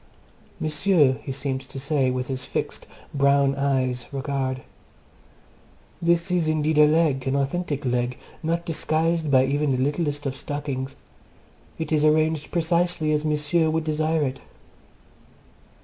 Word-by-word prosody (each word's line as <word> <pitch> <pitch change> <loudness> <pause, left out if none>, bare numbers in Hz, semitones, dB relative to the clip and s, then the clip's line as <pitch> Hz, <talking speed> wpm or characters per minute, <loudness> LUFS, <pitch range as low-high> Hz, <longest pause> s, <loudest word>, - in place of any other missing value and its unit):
"M'sieu," 155 -3 +2
he - - -6
seemed 135 -1 -3
to 135 +1 -9
say, 140 -1 +1
with 125 0 -2
his 130 -1 -4
fixed, - - -4 0.3
brown 140 0 +3
eyed 135 -2 0
regard, 135 -2 -2 1.4
"this 170 0 +2
is 175 -3 +1
indeed 155 0 +1
a 150 - +8
leg, 150 -4 +2
an 135 - +1
authentic 140 +1 -1
leg, 125 0 0 0.2
not 170 +1 -1
disguised 160 0 0
by 130 -1 +5
even 145 +1 0
the - - 0
littlest 145 +2 -1
of 135 -1 -2
stockings; 140 -2 -4 0.8
it 160 - -4
is 155 -1 +3
arranged 155 0 +2
precisely 170 -1 +1
as 150 0 +1
M'sieu 155 +2 +1
would 160 0 0
desire 155 0 0
it." 135 -1 -3
150 Hz, 135 wpm, -24 LUFS, 135-160 Hz, 1.4 s, a